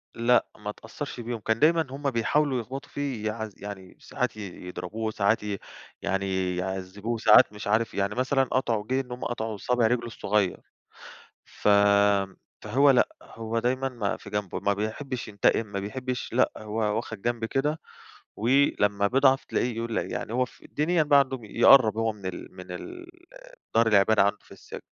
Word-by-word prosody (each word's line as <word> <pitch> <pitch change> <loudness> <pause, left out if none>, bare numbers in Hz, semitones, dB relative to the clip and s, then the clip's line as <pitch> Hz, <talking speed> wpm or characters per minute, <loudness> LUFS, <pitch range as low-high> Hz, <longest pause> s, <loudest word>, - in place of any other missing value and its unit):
لأ، 120 +1 +3
ما 105 -1 -6
أتأثّرش 120 +6 -7
بيهم. 120 0 -4
كان 110 +1 -1
دايمًا 160 0 +4
هم 140 +1 -2
بيحاولوا 130 +3 +1
يخبطوا 135 +4 -8
فيه 135 -7 -4
يعذ 110 0 -4
يعني 100 -2 -9
ساعات 125 -4 -3
ي 95 -3 -8
يضربوه، 105 +5 -4
ساعات 105 +1 +1
ي 105 -1 -3 0.4
يعني 95 -2 -1
يعذبوه، 95 +5 -4
ساعات 110 -1 +6
مش 105 0 -7
عارف 110 +2 +1
يعني 100 +1 -1
مثلًا 130 +2 +2
قطعوا 120 -5 -1
جه 130 +2 +1
إن 125 -2 -13
هم 125 - -6
قطعوا 110 -3 -3
صابع 120 +2 +1
رجله 120 +1 0
الصغيّر. 105 -4 0 0.9
ف - - -3 0.9
فهو 135 +7 +4
لأ، 125 - +4
هو 115 0 -4
دايمًا 130 +3 0
ما 115 -6 -2
في 105 - -12
جنب، 105 -3 -3
ما 100 - +3
بيحبش 115 +5 -4
ينتقم 105 +2 +1
ما 100 -1 -4
بيحبش 125 +5 -4
لأ 125 - +3
هو 110 0 -7 0.2
واخد 110 -3 -5
جنب 120 -1 -1
كده، 145 +6 -1 0.6
ولما 105 -5 +2
بيضعَف 135 +3 +3
تلاقيه 120 -2 -1
يقول 115 -1 -2
يعني 120 -3 -4
هو 125 +2 +2
ف 125 - -16
الدنيا 160 +3 0
بقى 145 -1 +5
عنده، 135 -1 +1
يقرب 110 +1 +5
هو 115 0 +1
من 100 -3 -11
ال 90 0 -7
من 90 -1 -10
ال 350 - -8 0.7
دار 115 0 +4
العبادة 105 0 +4
عنده 100 +1 +1
في - - -18
السجن. - - -10
115 Hz, 170 wpm, -26 LUFS, 105-130 Hz, 0.9 s, ساعات